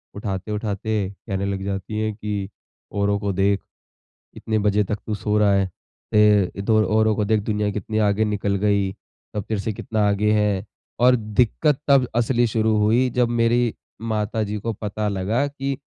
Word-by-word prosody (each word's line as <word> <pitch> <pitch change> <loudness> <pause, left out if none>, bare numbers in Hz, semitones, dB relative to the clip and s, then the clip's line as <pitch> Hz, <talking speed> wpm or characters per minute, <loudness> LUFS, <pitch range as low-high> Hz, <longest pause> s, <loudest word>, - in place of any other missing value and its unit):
उठाते-उठाते 105 +2 -3 0.3
कहने 100 -2 -2
लग 100 -1 -3
जाती 100 +2 -3
है 110 0 0
कि 105 -2 -4 0.4
औरों 100 0 +1
को 100 -1 -1
देख 100 +1 +2 0.8
इतने 110 -1 -1
बजे 105 0 +2
तक 105 +2 -3
तू 110 - -2
सो 105 +1 -1
रहा 105 -1 +4
है। 100 0 +3
अ, 105 +1 +1
तो 110 -1 +4
औरों 110 0 +3
को 105 - +1
देख 110 +1 +2
दुनिया 105 -1 -1
कितनी 110 +2 -3
आगे 100 +2 +2
निकल 105 -1 -1
गई, 100 -2 +2
सब 105 +1 -10
तेरे 110 -3 -1
से 110 - -2
कितना 105 +1 -1
आगे 100 +1 +2
हैं, 105 -1 +1 0.3
और 125 +1 +6
दिक्कत 125 +6 +1
तब 135 -3 +5
असली 120 +1 +2
शुरू 110 -1 +1
हुई 110 +5 +3
जब 120 0 +1
मेरी 120 0 +2 0.4
माताजी 105 0 -1
को 115 +3 -3
पता 105 0 -3
लगा 105 +7 0
कि 140 -1 -3
105 Hz, 170 wpm, -22 LUFS, 100-110 Hz, 0.8 s, और